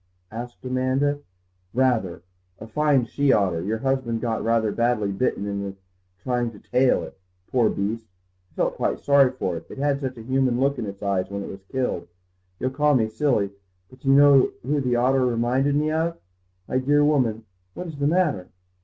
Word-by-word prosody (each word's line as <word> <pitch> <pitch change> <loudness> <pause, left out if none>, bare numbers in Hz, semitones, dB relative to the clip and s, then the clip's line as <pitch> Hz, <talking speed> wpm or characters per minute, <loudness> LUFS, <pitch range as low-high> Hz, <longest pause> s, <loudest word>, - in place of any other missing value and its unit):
asked 120 +3 -8
Amanda. 130 +3 0 0.6
"Rather. 115 -10 +1 0.3
A 110 - -9
fine 140 +2 +2
she 140 +4 +1
otter. 95 -7 +2
Your 110 +4 -1
husband 130 -2 -1
got 115 -1 -2
rather 115 -1 +1
badly 115 -3 0
bitten 100 0 -1
in 100 -1 -4 0.5
trying 120 -1 0
to 110 - -13
'tail 125 +4 +2
it.' - - -11 0.3
Poor 120 -4 +3
beast, 110 +3 -3 0.4
I - - -32
felt - - -1
quite - - -1
sorry 140 -2 +5
for 95 -9 -3
it, 80 - -10
it - - -10
had 140 0 0
such 130 -2 -4
a 115 - -9
human 130 0 +1
look 140 +1 +1
in 110 - -3
its 100 +1 -8
eyes 95 -2 0
when 100 0 -4
it - - -7
was 95 - -10
killed. 130 +5 -2 0.5
You'll 130 - -1
call 150 +1 +2
me 110 -3 +2
silly, 110 -5 0 0.4
but 130 - -16
do - - -10
you 135 - +6
know 140 -2 +6
who 145 +3 0
the 125 -2 0
look 130 +1 +3
reminded 125 +4 +1
me 150 +1 +1
of? 165 +2 -1 0.5
My 130 - 0
dear 145 +3 +3
woman, 120 -7 +1 0.3
what 180 - -5
is 160 -4 -8
the 140 - +2
matter?" 155 - +1
125 Hz, 190 wpm, -24 LUFS, 110-140 Hz, 0.6 s, you